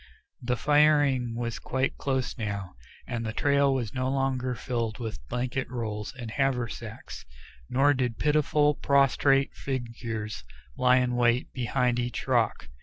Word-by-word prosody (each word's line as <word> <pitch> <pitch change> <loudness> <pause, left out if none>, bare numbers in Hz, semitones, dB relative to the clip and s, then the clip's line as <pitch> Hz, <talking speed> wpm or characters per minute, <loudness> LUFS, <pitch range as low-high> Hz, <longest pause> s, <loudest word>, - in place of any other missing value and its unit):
The 125 0 -1
firing 145 -4 +3
was 115 -1 -3
quite 130 +1 -1
close 130 -2 -1
now, 100 -5 -4 0.3
and 120 -2 -3
the 110 - -2
trail 140 +2 +3
was 125 -5 -2
no 130 0 -1
longer 130 -2 0
filled 115 -3 -3
with 110 -3 -5
blanket 125 +2 -2
rolls 110 -4 -4
and 120 -3 -6
haversacks, 120 -4 -3 0.5
nor 140 +3 +4
did 125 -4 -1
pitiful, 150 0 +3
prostrate 140 0 +3
figures 115 - -4 0.3
lie 125 0 +4
in 125 -1 +1
wait 120 0 +2
behind 125 0 0
each 120 0 -3
rock. - - +1
125 Hz, 135 wpm, -27 LUFS, 115-135 Hz, 0.5 s, nor